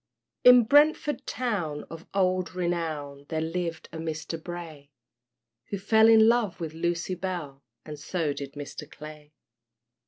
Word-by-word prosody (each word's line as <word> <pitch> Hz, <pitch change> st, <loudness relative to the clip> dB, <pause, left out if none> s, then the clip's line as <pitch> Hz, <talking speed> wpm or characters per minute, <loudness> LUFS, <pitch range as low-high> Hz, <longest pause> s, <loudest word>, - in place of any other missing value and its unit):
In 250 Hz, -1 st, +9 dB
Brentford 295 Hz, +3 st, +3 dB
town, 185 Hz, -12 st, -2 dB
of 165 Hz, +1 st, -10 dB
old 185 Hz, -2 st, 0 dB
renown, 155 Hz, -5 st, -3 dB
There 160 Hz, -, -1 dB
lived 165 Hz, 0 st, -3 dB
a 160 Hz, -, -7 dB
Mister 160 Hz, 0 st, -4 dB
Bray, 160 Hz, -4 st, -8 dB, 0.8 s
Who 200 Hz, -, -2 dB
fell 220 Hz, +3 st, +4 dB
in 220 Hz, -1 st, +7 dB
love 230 Hz, -5 st, +2 dB
with 160 Hz, -2 st, -5 dB
Lucy 170 Hz, +2 st, -2 dB
Bell, 170 Hz, -7 st, -5 dB, 0.2 s
And 150 Hz, -1 st, -8 dB
so 155 Hz, -1 st, -2 dB
did 140 Hz, -1 st, -7 dB
Mr. 145 Hz, +1 st, -8 dB
Clay. 150 Hz, 0 st, -11 dB
170 Hz, 135 wpm, -27 LUFS, 155-195 Hz, 0.8 s, In